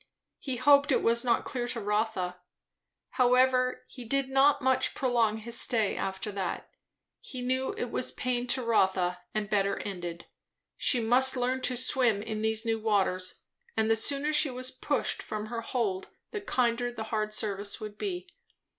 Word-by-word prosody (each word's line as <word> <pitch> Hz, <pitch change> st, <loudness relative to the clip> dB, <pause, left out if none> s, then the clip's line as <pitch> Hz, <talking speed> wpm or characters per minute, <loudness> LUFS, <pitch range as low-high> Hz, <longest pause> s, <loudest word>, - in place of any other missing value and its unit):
He 265 Hz, -3 st, -4 dB
hoped 285 Hz, +3 st, +5 dB
it -, -, +2 dB
was 235 Hz, +1 st, +3 dB
not 240 Hz, -2 st, +1 dB
clear 245 Hz, -2 st, -3 dB
to 240 Hz, -1 st, -3 dB
Rotha. 210 Hz, -4 st, -1 dB, 0.7 s
However, 255 Hz, 0 st, +3 dB
he 250 Hz, -, -10 dB
did 270 Hz, +3 st, 0 dB
not 270 Hz, +2 st, +4 dB
much 260 Hz, -1 st, +1 dB
prolong 235 Hz, -4 st, +1 dB
his 230 Hz, +2 st, -2 dB
stay 220 Hz, -5 st, +1 dB
after 190 Hz, +2 st, -4 dB
that. 195 Hz, -3 st, -4 dB, 0.5 s
He 255 Hz, -2 st, -8 dB
knew 260 Hz, +1 st, -1 dB
it 245 Hz, -, -4 dB
was 255 Hz, -, 0 dB
pain 245 Hz, -1 st, -2 dB
to 255 Hz, +1 st, -1 dB
Rotha 190 Hz, -5 st, +1 dB, 0.2 s
and 215 Hz, -1 st, -1 dB
better 200 Hz, -1 st, +1 dB
ended; 175 Hz, -4 st, -6 dB, 0.5 s
she 250 Hz, -, +2 dB
must 255 Hz, +3 st, +5 dB
learn 255 Hz, +1 st, 0 dB
to 250 Hz, -1 st, 0 dB
swim 245 Hz, -4 st, +2 dB
in 215 Hz, -1 st, -4 dB
these 220 Hz, +1 st, 0 dB
new 225 Hz, -1 st, 0 dB
waters, 195 Hz, -4 st, -1 dB, 0.3 s
and 220 Hz, 0 st, +2 dB
the -, -, +5 dB
sooner 285 Hz, +6 st, +1 dB
she 300 Hz, -1 st, +4 dB
was 255 Hz, 0 st, -4 dB
pushed 285 Hz, +3 st, -2 dB
from 215 Hz, 0 st, -5 dB
her 230 Hz, +1 st, -5 dB
hold 220 Hz, -6 st, -2 dB, 0.2 s
the 420 Hz, -, -4 dB
kinder 245 Hz, -7 st, 0 dB
the 225 Hz, -2 st, -6 dB
hard 215 Hz, -1 st, 0 dB
service 205 Hz, -1 st, -1 dB
would 215 Hz, -1 st, -8 dB
be. 360 Hz, -2 st, -4 dB
235 Hz, 170 wpm, -29 LUFS, 215-255 Hz, 0.7 s, hoped